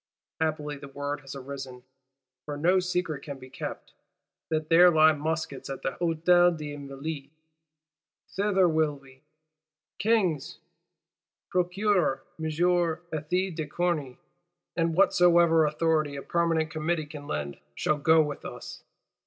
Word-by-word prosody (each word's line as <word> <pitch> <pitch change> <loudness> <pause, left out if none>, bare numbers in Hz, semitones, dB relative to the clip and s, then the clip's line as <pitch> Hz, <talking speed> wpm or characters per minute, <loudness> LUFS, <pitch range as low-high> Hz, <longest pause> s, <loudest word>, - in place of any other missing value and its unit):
Happily 150 -2 -2
the 140 - -10
word 145 +1 -4
has 135 0 -9
arisen, 135 -2 -8 0.6
for 145 -1 -5
no 180 +5 +3
secret 180 -5 -2
can 140 -2 -7
be 130 0 -13
kept,—that 155 +3 -7
there 175 +2 +7
lie 155 -1 +6
muskets 155 -2 -3
at 135 - -6
the 135 - 0
Hôtel 175 +1 +4
des 150 -1 -6
Invalides. 140 0 -6 1.1
Thither 195 -2 +3
will 155 -2 +1
we: 135 -1 -18 0.8
King's 190 -10 +1 0.9
Procureur 180 -6 +1 0.2
M. 160 - -4
Ethys 175 +1 0
de 155 -2 -3
Corny, 155 -5 -1 0.6
and 165 -1 0
whatsoever 170 -4 +5
of 150 - -4
authority 155 -3 +1
a 140 - -6
Permanent 165 -2 0
Committee 155 0 -1
can 145 -1 -10
lend, 70 -1 -4 0.2
shall 155 - 0
go 160 +2 +5
with 150 -1 -6
us. - - -8
155 Hz, 130 wpm, -27 LUFS, 145-175 Hz, 1.1 s, there